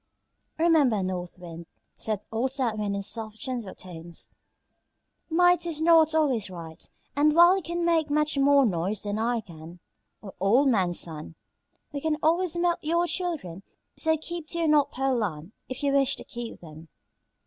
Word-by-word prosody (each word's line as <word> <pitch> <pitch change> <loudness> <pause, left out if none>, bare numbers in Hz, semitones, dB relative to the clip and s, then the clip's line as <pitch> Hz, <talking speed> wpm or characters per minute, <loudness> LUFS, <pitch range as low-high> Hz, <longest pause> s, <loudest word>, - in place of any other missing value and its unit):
"Remember, 300 - +3
North 180 -1 -4
Wind," 170 -2 -10 0.3
said 215 -2 -3
old 235 +4 -1
South 245 -6 -1
Wind 205 -1 -1
in 200 - -3
soft, 220 +1 -5
gentle 240 -6 -5
tones, 170 -2 -9 1.0
"might 355 +1 +3
is 320 -3 -2
not 320 -1 +5
always 260 -10 +1
right, 165 -3 -8 0.3
and 300 +1 +3
while 345 +2 +7
you 385 - -2
can 340 0 -3
make 325 -3 +2
much 300 +1 +1
more 280 0 +5
noise 190 0 -1
than 205 +1 -2
I 235 +1 0
can 170 -3 -12 0.4
or 200 -3 -10
old 235 +9 +4
man 190 -7 +2
Sun, 160 -1 -3 0.6
we 285 -1 -5
can 315 0 0
always 340 +2 +2
melt 345 0 +1
your 340 +3 +1
children; 325 - -3 0.3
so 320 0 +1
keep 335 0 -6
to 340 - -4
your 335 -1 +1
North 300 -2 +4
Pole 265 0 0
Land 175 -5 -3 0.2
if 255 +2 -6
you 280 -1 +2
wish 275 0 +3
to - - -10
keep 240 -1 -8
them." 160 -1 -12
260 Hz, 170 wpm, -26 LUFS, 190-315 Hz, 1.0 s, while